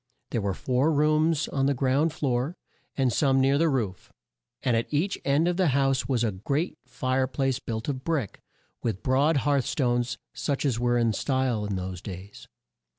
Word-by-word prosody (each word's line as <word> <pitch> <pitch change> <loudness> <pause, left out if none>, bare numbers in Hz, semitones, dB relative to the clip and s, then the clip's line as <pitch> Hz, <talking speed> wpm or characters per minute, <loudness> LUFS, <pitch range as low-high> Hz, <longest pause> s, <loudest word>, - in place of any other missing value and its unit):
There 115 - 0
were 100 -2 -1
four 130 - +1
rooms 155 +1 +2
on 135 -1 +1
the 140 - +2
ground 135 +5 +2
floor, 140 +1 -1 0.4
and 130 -4 +2
some 135 +2 +3
near 135 +2 +3
the 165 0 +3
roof, 110 -10 -2 0.5
and 125 -3 +2
at 115 - -1
each 160 +7 +1
end 140 +4 +2
of 175 0 0
the 185 -2 +3
house 135 -3 +1
was 125 -3 +1
a 110 - +1
great 140 - -2
fire 130 +1 0
place 135 -1 -1
built 110 -1 -5
of 130 -2 -3
brick, 150 - -2 0.4
with 110 -5 -3
broad 140 +4 +3
hearth 140 -3 +2
stones, 120 -3 0 0.2
such 140 0 -2
as 125 -5 +1
were 120 0 +2
in 115 -2 +2
style 130 -3 0
in 100 - -2
those 90 -1 -5
days. 95 +1 -9
130 Hz, 185 wpm, -27 LUFS, 120-145 Hz, 0.5 s, some